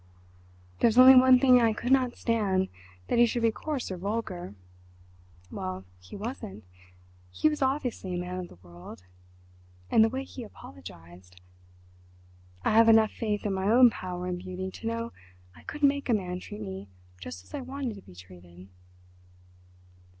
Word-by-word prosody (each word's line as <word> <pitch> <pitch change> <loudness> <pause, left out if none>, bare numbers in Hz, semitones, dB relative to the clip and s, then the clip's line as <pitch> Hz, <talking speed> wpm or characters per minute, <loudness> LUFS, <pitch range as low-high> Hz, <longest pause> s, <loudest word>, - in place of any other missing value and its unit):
"There's 235 0 +3
only 260 +1 +10
one 255 0 +7
thing 250 -1 +5
I 225 -1 +3
could 245 +4 -4
not 255 -2 +2
stand—that 190 - -2
he 240 - +6
should 235 +1 -2
be 230 - +4
coarse 280 -1 -4
or 185 - -4
vulgar. 185 - -4 1.0
Well, 95 0 -5
he 90 - -12
wasn't—he 90 - -6
was 300 -1 -1
obviously 260 -9 -1
a - - -2
man 180 +1 -5
of 180 - -6
the - - -16
world, 85 +1 -12 0.9
and 220 - +6
the 225 - +3
way 265 +3 -4
he 265 -2 -9
apologised... 90 - -13 1.3
I - - +3
have 225 +1 +6
enough 220 -1 +5
faith 210 -3 -3
in 205 - 0
my 190 +1 -1
own 245 +1 +7
power 180 -3 -6
and 180 -1 -3
beauty 185 +1 -6
to 225 - -7
know 230 0 -3 0.4
I - - -16
could 295 0 -8
make 280 -1 +2
a 235 - +4
man 180 -3 -4
treat 105 - -9
me 95 -1 -7 0.3
just 90 0 -9
as 95 - -20
I - - -4
wanted 260 -2 -5
to 200 - -12
be 90 - -17
treated."... 90 0 -15
190 Hz, 165 wpm, -28 LUFS, -, 1.3 s, only